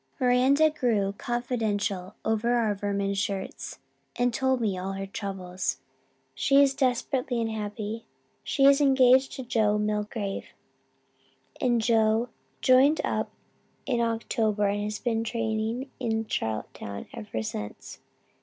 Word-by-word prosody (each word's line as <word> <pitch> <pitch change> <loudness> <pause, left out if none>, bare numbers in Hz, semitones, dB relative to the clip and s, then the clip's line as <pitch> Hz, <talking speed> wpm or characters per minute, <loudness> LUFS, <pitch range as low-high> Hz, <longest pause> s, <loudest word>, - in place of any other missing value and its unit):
"Miranda 265 +5 +4
grew 220 -9 0
confidential 215 -6 -2
over 225 +2 +1
our 225 -3 +2
vermin 200 0 -1
shirts 195 -1 -3 0.4
and 245 0 +1
told 265 0 +1
me 210 -5 0
all 185 +1 -4
her 195 0 -4
troubles. 190 -2 -4 0.6
She 275 +1 +3
is 280 -1 +5
desperately 255 -1 0
unhappy. 220 0 -4 0.4
She 275 - +2
is 280 +1 +6
engaged 265 -1 +5
to 260 - -5
Joe 215 -3 +2
Milgrave 210 -1 -2 1.2
and 240 -3 +3
Joe 225 +1 +2 0.3
joined 265 +4 +5
up - - -1 0.6
in 245 -4 0
October 225 -2 0
and 205 +1 -1
has 210 0 -3
been 225 -2 -1
training 230 +3 -2
in 225 -3 -1
Charlottetown 110 - -4
ever 110 +1 -5
since. 105 -1 -6
225 Hz, 120 wpm, -27 LUFS, 205-250 Hz, 1.2 s, is